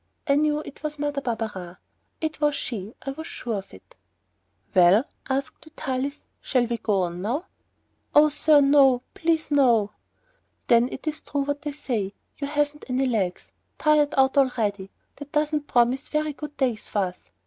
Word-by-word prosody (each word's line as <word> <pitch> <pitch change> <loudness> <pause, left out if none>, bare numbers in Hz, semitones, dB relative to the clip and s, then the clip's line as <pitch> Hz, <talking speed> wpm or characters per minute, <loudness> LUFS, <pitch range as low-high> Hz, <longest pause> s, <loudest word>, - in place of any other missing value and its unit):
I 280 - +4
knew 300 +1 +2
it 280 - -11
was 300 -1 -4
Mother 290 -1 -2
Barberin. 215 -8 -4 0.4
It 315 -1 -3
was 295 -1 +3
she. 220 -6 -5
I 275 - -3
was 315 +4 -7
sure 225 -4 -3
of 190 - -13
it. 95 - -17 0.8
"Well," 185 +5 +6 0.3
asked 270 +1 -2
Vitalis, 280 -2 -4 0.2
"shall 250 -3 +1
we 235 0 -3
go 200 -3 +1
on 175 0 -4
now?" 255 - -2 0.7
"Oh, 300 +1 +7
sir, 295 0 +4
no, 275 -3 +5
please 325 -1 0
no." 235 -8 +4 0.7
"Then 235 +1 +4
it - - -7
is 310 -1 -2
true 285 - -2
what 285 +1 -2
they 300 -1 -3
say, 225 -9 -3 0.2
you 280 - -2
haven't 295 0 -1
any 255 +2 +1
legs, 205 -8 -1 0.3
tired 300 -1 +3
out 265 +1 +4
already. 210 -7 0 0.3
That 290 0 -10
doesn't 300 -1 0
promise 245 +3 +2
very 305 0 -1
good 295 0 -8
days 245 -6 -1
for - - -4
us." 180 -1 -5
275 Hz, 170 wpm, -25 LUFS, 225-295 Hz, 0.8 s, Oh